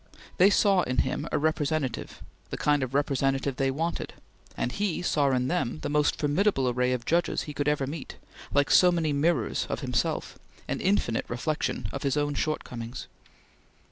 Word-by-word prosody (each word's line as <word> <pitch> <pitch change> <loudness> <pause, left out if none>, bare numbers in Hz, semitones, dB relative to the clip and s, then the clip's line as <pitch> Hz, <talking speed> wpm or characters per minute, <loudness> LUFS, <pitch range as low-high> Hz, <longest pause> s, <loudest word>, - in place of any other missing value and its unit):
They 190 +2 +7
saw 195 -2 +4
in 125 -5 -2
him 130 - 0
a - - +1
representative 150 -4 -1 0.3
the - - -4
kind 145 -1 +2
of 130 0 -3
representative 135 -1 0
they 135 0 +1
wanted 165 +5 -3 0.4
and 125 - -1
he 195 -1 -2
saw 145 -5 +2
in 125 -1 +1
them 165 -7 -1
the - - -2
most 150 0 +2
formidable 150 -1 +1
array 125 +1 +1
of 125 -2 -2
judges 170 +2 +1
he 150 - -7
could 145 0 -2
ever 150 -2 +1
meet, 145 +2 -6 0.4
like 145 -1 +2
so 180 -1 +7
many 160 -4 0
mirrors 145 -4 +1
of - - -3
himself, - - -2 0.3
an - - -2
infinite 185 - +1
reflection 150 +6 -2
of 140 - -4
his 140 +1 0
own 145 0 0
shortcomings. 125 -5 -4
145 Hz, 170 wpm, -27 LUFS, 130-160 Hz, 0.4 s, They